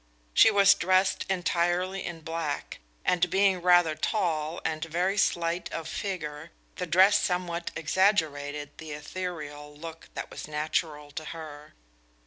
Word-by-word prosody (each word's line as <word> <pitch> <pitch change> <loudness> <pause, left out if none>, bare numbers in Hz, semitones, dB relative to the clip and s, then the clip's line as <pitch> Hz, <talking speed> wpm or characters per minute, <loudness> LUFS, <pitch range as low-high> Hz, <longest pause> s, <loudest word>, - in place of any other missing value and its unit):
She - - +7
was 200 -2 +6
dressed 185 +1 +2
entirely 180 +1 0
in 170 -2 -6
black, 160 -2 -4 0.3
and 180 0 +2
being 190 0 +3
rather 175 -2 +5
tall 160 -3 -1
and 155 0 -1
very 175 +4 0
slight 170 -3 0
of 165 -1 -4
figure, 160 -4 -4 0.3
the 180 - -3
dress 190 +5 +6
somewhat 175 -1 -1
exaggerated 150 -5 0
the 155 -2 -7
ethereal 150 -2 -6
look 165 +1 -9
that - - -5
was - - -7
natural 150 -1 -2
to 155 +2 -6
her. 150 -2 -9
165 Hz, 130 wpm, -28 LUFS, 155-180 Hz, 0.3 s, She